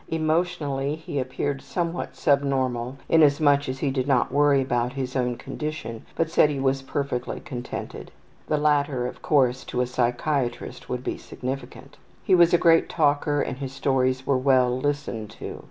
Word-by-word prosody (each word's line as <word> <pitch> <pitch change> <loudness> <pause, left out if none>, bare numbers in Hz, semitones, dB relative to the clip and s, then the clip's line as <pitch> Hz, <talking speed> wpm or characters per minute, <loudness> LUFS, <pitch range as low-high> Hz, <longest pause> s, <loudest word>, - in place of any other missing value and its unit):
Emotionally 155 -3 0
he 155 -3 -5
appeared 135 +2 -2
somewhat 170 -1 -3
subnormal 130 -3 0
inasmuch 145 -3 +4
as 130 - -3
he 140 0 -1
did 130 0 -1
not 130 -4 +2
worry 145 -1 +4
about 125 -1 0
his 130 -2 -4
own 125 -2 0
condition, 150 -6 -6
but 165 - +1
said 160 -2 +4
he 145 -2 -3
was 135 0 +1
perfectly 135 -2 -3
contented. 125 -2 -7 0.4
(The 150 - +1
latter, 145 -4 +1
of 125 - -6
course, 130 -4 +2
to 125 - -3
a 125 - +2
psychiatrist 125 +1 -2
would 125 0 -3
be - - -3
significant.) 130 +1 -7 0.3
He 190 - +2
was 175 -1 +6
a 175 - +5
great 165 -1 +4
talker 145 -1 +1
and - - -4
his 135 -2 -5
stories 130 -1 0
were 135 -2 +2
well 130 -2 +3
listened 130 -5 -2
to. - - -7
135 Hz, 165 wpm, -25 LUFS, 130-145 Hz, 0.4 s, was